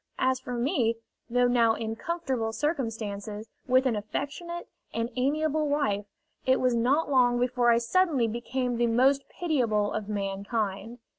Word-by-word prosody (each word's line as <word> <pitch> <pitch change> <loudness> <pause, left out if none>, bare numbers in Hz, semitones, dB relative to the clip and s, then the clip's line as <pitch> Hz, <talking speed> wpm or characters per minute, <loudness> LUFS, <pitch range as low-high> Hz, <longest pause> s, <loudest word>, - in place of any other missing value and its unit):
As 260 0 +1
for 250 - -6
me, 240 -2 +1 0.3
though 245 +1 +3
now 235 -2 +3
in 225 -1 -3
comfortable 265 -6 -2
circumstances, 220 -7 -3 0.2
with 255 +1 +4
an 250 -4 +2
affectionate 290 +11 -4 0.2
and 230 +1 -2
amiable 305 +3 +1
wife, 210 -9 0 0.4
it 260 0 +3
was 255 -1 +2
not 270 +7 +2
long 245 -2 +4
before 245 -1 +2
I 230 - +5
suddenly 275 0 +2
became 245 +2 -2
the 240 0 +2
most 265 +4 +3
pitiable 235 - 0
of 210 -1 -4
mankind. 200 +2 -3
245 Hz, 145 wpm, -28 LUFS, 225-275 Hz, 0.4 s, I